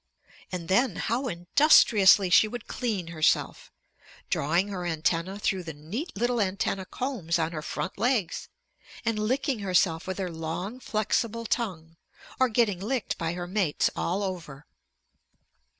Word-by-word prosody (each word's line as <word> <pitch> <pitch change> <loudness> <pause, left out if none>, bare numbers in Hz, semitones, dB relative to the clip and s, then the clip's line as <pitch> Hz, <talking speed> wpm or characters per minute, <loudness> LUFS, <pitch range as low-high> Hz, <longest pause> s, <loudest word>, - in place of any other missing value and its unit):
And 175 -3 -5
then 245 +8 +2
how 250 +4 -1
industriously 195 - +5
she 215 - +6
would 240 +1 -7
clean 210 -9 -3
herself, 160 -2 0 0.6
drawing 170 +7 +1
her 195 -2 -4
antennæ 170 +3 -1
through 195 -2 0
the 160 -4 -7
neat 195 - -5
little 240 +4 0
antennæ 190 -2 -1
combs 225 -11 -2
on 165 0 -1
her 155 -2 -5
front 160 - -5
legs, 225 -6 0 0.6
and 225 -2 0
licking 255 +3 0
herself 180 -4 +1
with 185 - -3
her 185 -3 -3
long 165 +8 -5
flexible 230 0 -1
tongue, 170 -9 -3 0.4
or 260 -1 +4
getting 215 -5 +1
licked 230 +4 -2
by 165 0 -1
her 175 0 -4
mates 180 -4 0
all 190 +4 -1
over. 160 -7 -6
190 Hz, 140 wpm, -27 LUFS, 170-230 Hz, 0.6 s, she